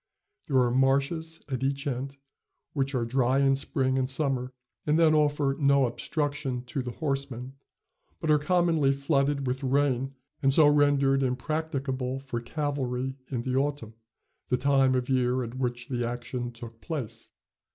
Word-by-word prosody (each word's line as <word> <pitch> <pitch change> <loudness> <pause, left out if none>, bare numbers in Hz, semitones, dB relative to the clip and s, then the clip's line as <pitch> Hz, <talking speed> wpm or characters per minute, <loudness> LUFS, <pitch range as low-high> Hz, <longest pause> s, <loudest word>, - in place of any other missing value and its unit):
There 140 -5 +2
are 125 -2 +4
marshes 140 +5 +1
at 130 -3 -3
each 140 +2 -1
end, 135 0 -3 0.6
which 135 -1 -1
are 120 -2 0
dry 130 +2 +2
in 135 -1 +4
spring 135 -1 0
and 130 0 0
summer 130 -2 -1 0.4
and 150 +1 +3
then 160 -2 +5
offer 145 -2 +2
no 140 -2 +4
obstruction 140 0 -2
to 130 +2 -3
the 125 - -5
horseman, 135 -4 -3 0.7
but 155 - 0
are 150 - +5
commonly 160 -3 +2
flooded 140 0 +1
with 130 +1 -2
rain 135 0 +1 0.3
and 135 - +4
so 155 +3 +6
rendered 145 -2 +4
impracticable 135 -1 -2
for 130 -3 -5
cavalry 130 -1 -2
in 120 -3 -2
the 130 0 -1
autumn, 140 -5 -1 0.6
the 125 - +2
time 135 -1 +3
of 125 -1 0
year 125 -1 +1
at 120 +2 -7
which 120 -1 -2
the 120 -2 -2
action 120 +1 -4
took 115 -1 -11
place. 115 -8 -5
135 Hz, 155 wpm, -28 LUFS, 125-145 Hz, 0.7 s, so